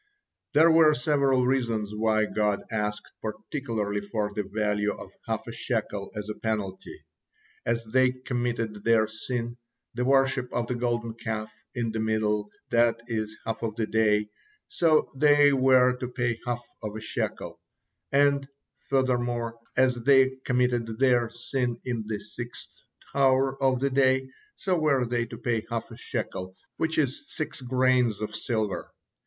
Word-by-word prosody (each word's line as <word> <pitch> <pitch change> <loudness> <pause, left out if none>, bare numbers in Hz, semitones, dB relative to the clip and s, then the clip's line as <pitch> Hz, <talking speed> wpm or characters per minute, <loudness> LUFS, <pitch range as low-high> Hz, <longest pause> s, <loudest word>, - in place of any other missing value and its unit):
There 160 +3 +6
were 160 -2 +6
several 135 -2 +2
reasons 115 -5 0
why 110 0 +2
God 105 -1 0
asked 105 -1 -2
particularly 110 -3 -3
for 105 0 -2
the 105 - -1
value 105 +1 0
of - - -10 0.2
half - - -2
a - - -6
shekel 100 -1 -3
as 105 0 -4
a 105 - -3
penalty. 105 -4 -4 0.6
As 115 0 0
they 130 +3 +3
committed 120 -4 -3
their 115 -1 +4
sin, 120 +2 -4 0.4
the 125 +1 -1
worship 130 -1 +2
of 120 - -1
the 125 - -2
Golden 120 -1 -1
Calf, 110 -1 -4 0.2
in 120 -2 -1
the 110 - -3
middle, 105 -1 0 0.2
that 115 0 +3
is 110 -3 -2
the 110 - -15
half 115 - -7
of 110 -2 -2
the 110 -1 0
day, 105 -1 +2 0.4
so 160 -3 +3
they 145 0 +5
were 130 -1 +5
to 125 - -4
pay 120 -2 -1
half 120 0 -2 0.2
of 105 -1 -5
a - - -4
shekel; 110 -2 -4 0.5
and, 140 0 +3 0.4
furthermore, 120 -3 0 0.2
as 130 0 +5
they 130 +2 +4
committed 125 -3 +1
their 125 -3 +3
sin 120 +1 -2
in 120 -4 -2
the 110 -2 -2
sixth 120 +3 -9 0.4
hour 135 -1 +3
of 130 -2 +3
the 140 +1 0
day, 130 0 +2 0.2
so 185 -3 0
were 140 -5 +2
they 120 0 -1
to 115 0 -8
pay 115 -2 -1
half 115 -1 -3
a - - -8
shekel, 95 0 -5 0.2
which 160 0 0
is 140 -4 +1
six 155 -3 -4
grains 125 -3 +2
of 105 0 -4
silver. 110 -3 -2
120 Hz, 155 wpm, -27 LUFS, 110-130 Hz, 0.6 s, There